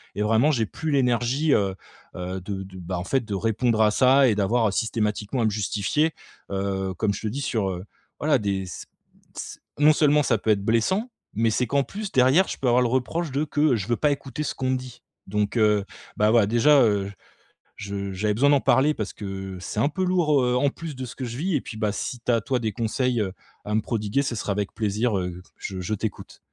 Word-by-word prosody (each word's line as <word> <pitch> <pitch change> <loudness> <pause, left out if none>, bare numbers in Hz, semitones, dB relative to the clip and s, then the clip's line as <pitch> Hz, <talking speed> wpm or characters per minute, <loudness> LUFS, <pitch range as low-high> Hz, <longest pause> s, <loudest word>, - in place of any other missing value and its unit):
et 105 - -2
vraiment, 115 +8 +3
j'ai 115 -5 +1
plus 160 +8 -4
l'énergie, 130 +2 +2
heu, 95 -2 +1 0.4
heu, 90 +1 -4
de 95 +1 -5
de, 95 -1 -11
ben, 90 +1 -4
en 90 - -3
fait, 130 +3 +1
de 100 -2 -3
répondre 115 +2 +1
à 105 - +5
ça 130 +3 +5
et 105 - +2
d'avoir 105 +1 +2
systématiquement 105 +2 -1
à 115 - +2
me - - +3
justifier, 105 +9 0 0.4
heu, 95 -1 -2
comme 105 0 +1
je - - -6
te 110 - -3
dis, 130 +7 -3
sur 110 -8 -1
heu, 90 +2 -6 0.3
voilà, 145 -3 +2
des 100 -2 -1
c 85 - -8 0.5
c - - -7 0.2
non 150 +1 +6
seulement 150 -1 +3
ça 115 -2 +2
peut 110 - -3
être 100 -2 +1
blessant, 190 - +1 0.2
mais 115 +2 +2
c'est 125 +4 +1
qu'en 140 +1 +2
plus 205 +4 -6
derrière 130 +9 +5
je - - -4
peux 130 - -2
avoir 120 +1 +4
le 120 - +1
reproche 135 +5 -1
de 145 +3 0
que 145 -2 +2
je 100 +1 -4
veux 120 - +1
pas 150 -1 +2
écouter 140 +1 -4
ce - - -2
qu'on 130 -1 -2
me 130 - +1
dit. 125 -1 -10 0.3
Donc, 105 +3 -1
heu, 105 -2 +3 0.3
bah, 105 +1 +3
voilà, 115 -3 +5
déjà, 135 +6 +5
heu, 100 -2 +1 0.7
je 100 -1 -5
j'avais 105 +3 0
besoin 140 +5 +4
d'en 140 - +5
parler 135 +5 +3
parce 110 -6 -4
que 95 -2 -6
c'est 105 - -4
un 140 - +3
peu 185 +4 -2
lourd, 165 -6 +3
heu, 125 0 +1
en 140 +2 +3
plus 155 0 -7
de 130 - -4
ce 120 - -9
que 130 - -6
je 120 +1 -6
vis. 175 +2 0
Et 140 - +1
puis, 110 - -8
bah, 105 -2 0
si 125 - -4
tu 125 - 0
as 115 - +2
toi, 125 +3 -1
des 110 -2 -2
conseils, 120 +1 0
heu, 95 -2 -2 0.3
à 105 - -3
me 110 - +2
prodiguer, 110 +4 -1
ce 125 -3 -2
sera 105 - -3
avec 100 0 -3
plaisir, 110 0 0
heu, 90 -1 -4 0.2
je 95 -2 -6
je 90 +4 -3
t'écoute. 105 -1 -6
115 Hz, 235 wpm, -24 LUFS, 100-135 Hz, 0.7 s, non